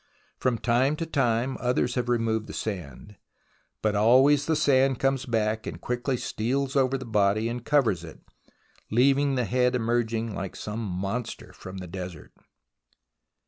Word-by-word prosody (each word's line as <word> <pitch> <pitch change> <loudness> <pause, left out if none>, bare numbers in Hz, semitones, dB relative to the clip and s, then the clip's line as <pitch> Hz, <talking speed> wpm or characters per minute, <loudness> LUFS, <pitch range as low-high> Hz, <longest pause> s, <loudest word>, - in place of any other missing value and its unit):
From 125 -3 +1
time 125 +6 +2
to 165 - -3
time 130 -4 0
others 125 0 0
have 120 -1 -2
removed 115 -2 0
the - - -8
sand, 95 - -6 0.7
but 105 -1 +1
always 130 +7 +5
the 160 - +2
sand 135 -3 +3
comes 135 0 0
back 110 -2 0
and - - -6
quickly 125 +1 -2
steals 130 +5 -2
over 135 -1 +2
the 130 - -8
body 105 0 +2
and 120 0 -4
covers 120 - +2
it, 80 - -11 0.7
leaving 135 +4 +3
the 125 -2 0
head 125 +2 +2
emerging 115 -1 0
like 95 -1 -5
some 105 +1 -5
monster 100 +5 -4
of 95 0 -6
the 90 - -6
desert. 90 -2 -8
120 Hz, 150 wpm, -26 LUFS, 110-130 Hz, 0.7 s, always